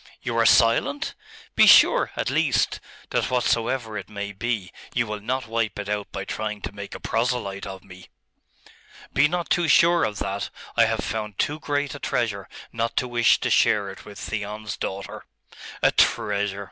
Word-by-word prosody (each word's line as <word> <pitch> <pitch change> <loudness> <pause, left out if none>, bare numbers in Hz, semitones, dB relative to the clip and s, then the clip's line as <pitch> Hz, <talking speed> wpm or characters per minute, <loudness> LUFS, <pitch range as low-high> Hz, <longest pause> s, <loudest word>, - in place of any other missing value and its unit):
You 120 -3 -2
are 115 - +5
silent? 115 +5 +3 0.4
Be - - +6
sure, - - +7
at - - -1
least, - - +1 0.3
that - - 0
whatsoever 120 -2 0
it 100 - -10
may 100 -1 -5
be, 100 -2 -3 0.2
you 120 - +2
will 105 -1 -5
not 130 +5 -2
wipe 115 -2 -1
it 105 -1 -5
out 105 -1 -3
by 95 - -5
trying 105 0 -4
to - - -5
make 100 -1 -8
a - - -7
proselyte 115 -5 -2
of 95 -1 -8
me!' 90 -1 -14 1.1
'Be 145 +2 +5
not 175 +1 -3
too 175 -1 +2
sure 170 +3 +5
of 105 -1 -1
that. 100 0 -3 0.3
I - - +5
have - - -1
found 105 -2 -4
too 150 +1 -1
great 145 -2 -2
a 145 - -8
treasure 100 -8 -2 0.2
not 115 0 -2
to 125 - +1
wish 120 -2 +3
to - - -1
share 100 -2 +3
it 95 - -12
with 105 -1 -12
Theon's 105 0 -5
daughter.' 95 0 -5 0.6
'A - - +5
treasure? 100 -1 +1
110 Hz, 180 wpm, -24 LUFS, 100-125 Hz, 1.1 s, sure